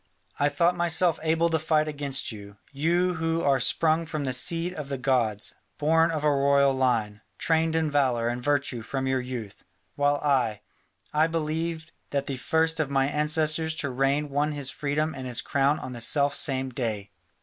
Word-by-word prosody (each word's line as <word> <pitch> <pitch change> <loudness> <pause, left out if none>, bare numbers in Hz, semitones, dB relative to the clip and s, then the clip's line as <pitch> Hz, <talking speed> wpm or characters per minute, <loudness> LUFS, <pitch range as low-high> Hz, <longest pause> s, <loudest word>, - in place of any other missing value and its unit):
I 145 - +3
thought 175 +3 +2
myself 175 -1 +2
able 165 +1 +1
to 160 - +1
fight 155 0 +1
against 140 -3 -2
you, 100 -1 -11
you 170 +6 +1
who 165 0 0
are 135 -1 +3
sprung 160 0 +2
from 155 -2 -3
the 130 -2 -1
seed 165 +7 +1
of 150 -5 -7
the 140 - -3
gods, 120 -6 0 0.2
born 160 +2 +3
of 155 -3 -3
a 150 - +3
royal 140 0 +3
line, 115 -5 0 0.2
trained 160 0 +1
in 160 -2 0
valour 130 -5 +1
and 120 +1 -2
virtue 140 -3 0
from 135 +4 -4
your 130 -1 0
youth, 125 -5 -7 0.3
while 145 0 +2
I 125 -8 +1 0.5
I 155 +2 +3
believe 160 +1 -3 0.2
that 140 -1 -1
the 135 -2 -4
first 160 +5 0
of 155 -3 0
my 135 0 +1
ancestors 155 +1 +1
to 140 -3 -3
reign 135 +3 0
won 145 +2 0
his 140 -2 -3
freedom 150 +2 -2
and 130 -1 -7
his 120 -1 -1
crown 140 +2 +1
on 130 - -7
the 120 - -7
self 140 +4 +3
same 130 -2 0
day. 110 -5 -4
145 Hz, 185 wpm, -26 LUFS, 130-160 Hz, 0.5 s, I